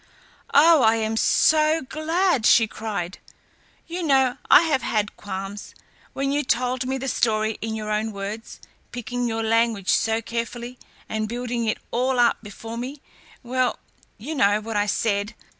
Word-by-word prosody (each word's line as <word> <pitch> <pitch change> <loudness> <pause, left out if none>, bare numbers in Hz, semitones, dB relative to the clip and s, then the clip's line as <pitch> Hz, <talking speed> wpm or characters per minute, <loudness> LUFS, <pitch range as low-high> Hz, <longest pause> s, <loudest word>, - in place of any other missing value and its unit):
"Oh! 315 +1 +7
I 225 -1 +5
am 220 0 -1
so 310 +6 +3
glad," 315 - 0
she 225 - +6
cried. 205 -5 -5 0.7
"You 345 +2 -5
know, 265 -5 +2
I 320 - +8
have 295 -5 +1
had 210 -3 -1
qualms. 195 0 -7 0.4
When 275 0 -1
you 290 +1 +1
told 250 +1 0
me 265 +1 -1
the 265 +1 -5
story 220 -3 0
in 220 0 -3
your 215 -1 -4
own 215 +1 -1
words, 205 +2 -7 0.3
picking 245 +1 -3
your 225 -1 -2
language 225 -3 +1
so 225 0 +2
carefully, 235 +2 -5 0.3
and 215 0 -3
building 240 0 -3
it 215 - 0
all 255 +2 0
up 240 -1 +4
before 225 +2 -8
me, 265 +4 -6 0.4
well, 255 +1 0 0.4
you 265 +10 -6
know 205 -7 +3
what 220 +1 -6
I 205 0 +1
said. 205 0 -1
230 Hz, 160 wpm, -23 LUFS, 215-260 Hz, 0.7 s, I